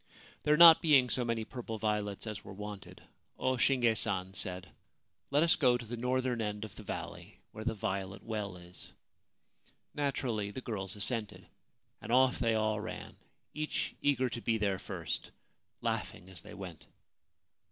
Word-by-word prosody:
There 150 Hz, 0 st, +3 dB
not 165 Hz, -1 st, +10 dB
being 140 Hz, -7 st, +5 dB
so 125 Hz, -, +2 dB
many 115 Hz, -2 st, -1 dB
purple 115 Hz, -2 st, -6 dB
violets 105 Hz, -1 st, -1 dB
as 105 Hz, -2 st, -5 dB
were 95 Hz, -, -9 dB
wanted, 105 Hz, -1 st, -8 dB, 0.3 s
O 130 Hz, 0 st, +1 dB
Shinge 120 Hz, -2 st, +3 dB
San 95 Hz, -3 st, -1 dB
said, 90 Hz, 0 st, -3 dB, 0.3 s
* -, -, -48 dB
Let 145 Hz, +3 st, +4 dB
us 170 Hz, +1 st, +6 dB
go 125 Hz, -5 st, +4 dB
to 120 Hz, -, -8 dB
the 120 Hz, +2 st, -5 dB
northern 125 Hz, 0 st, 0 dB
end 105 Hz, 0 st, -3 dB
of 105 Hz, -, -11 dB
the -, -, -10 dB
valley, -, -, -7 dB
where 110 Hz, -, -7 dB
the 115 Hz, 0 st, -1 dB
Violet 100 Hz, -2 st, -3 dB
Well 105 Hz, -4 st, -4 dB
is.' 90 Hz, 0 st, -11 dB, 1.0 s
Naturally 125 Hz, -7 st, -1 dB
the 105 Hz, -, -6 dB
girls 100 Hz, -6 st, -4 dB
assented, 105 Hz, +1 st, -1 dB, 0.6 s
and -, -, -6 dB
ofF 130 Hz, +1 st, +4 dB
they 115 Hz, -2 st, +2 dB
all 110 Hz, -1 st, +1 dB
ran, 110 Hz, -, -7 dB, 0.4 s
each 155 Hz, 0 st, -2 dB
eager 135 Hz, -3 st, +2 dB
to 120 Hz, -1 st, -5 dB
be 115 Hz, -1 st, +1 dB
there 100 Hz, -3 st, 0 dB
first, -, -, -4 dB, 0.5 s
laughing 90 Hz, -, -3 dB
as 85 Hz, -4 st, -6 dB
they -, -, -11 dB
went. 90 Hz, -5 st, -9 dB
110 Hz, 165 wpm, -32 LUFS, 100-125 Hz, 1.0 s, not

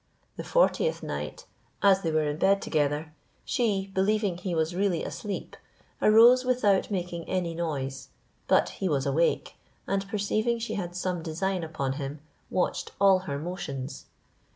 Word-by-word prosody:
The -, -, -6 dB
fortieth -, -, +2 dB
night, -, -, -5 dB, 0.4 s
as 195 Hz, -1 st, +5 dB
they 165 Hz, -, -1 dB
were 155 Hz, 0 st, +2 dB
in 145 Hz, 0 st, -2 dB
bed 195 Hz, +4 st, +3 dB
together, 150 Hz, -1 st, -1 dB, 0.3 s
she, 200 Hz, -7 st, 0 dB
believing 200 Hz, 0 st, +1 dB
he 175 Hz, 0 st, -3 dB
was 160 Hz, +1 st, 0 dB
really 185 Hz, -2 st, 0 dB
asleep, 205 Hz, -2 st, -5 dB, 0.5 s
arose 235 Hz, +4 st, +7 dB
without 245 Hz, -6 st, +2 dB
making 175 Hz, -4 st, -3 dB
any 180 Hz, -3 st, -1 dB
noise; 140 Hz, -6 st, -3 dB, 0.4 s
but -, -, +4 dB
he 190 Hz, -, -3 dB
was 140 Hz, -3 st, 0 dB
awake, 145 Hz, +5 st, +1 dB, 0.3 s
and 195 Hz, 0 st, -1 dB
perceiving 215 Hz, +3 st, 0 dB
she 230 Hz, +1 st, -4 dB
had 175 Hz, -3 st, -4 dB
some 180 Hz, -1 st, -2 dB
design 180 Hz, +3 st, -2 dB
upon 140 Hz, -4 st, -2 dB
him 140 Hz, +2 st, -5 dB, 0.3 s
watched 180 Hz, -, -1 dB
all 195 Hz, -1 st, +6 dB
her 140 Hz, -, -2 dB
motions. 145 Hz, -5 st, -5 dB
180 Hz, 150 wpm, -27 LUFS, 160-200 Hz, 0.5 s, arose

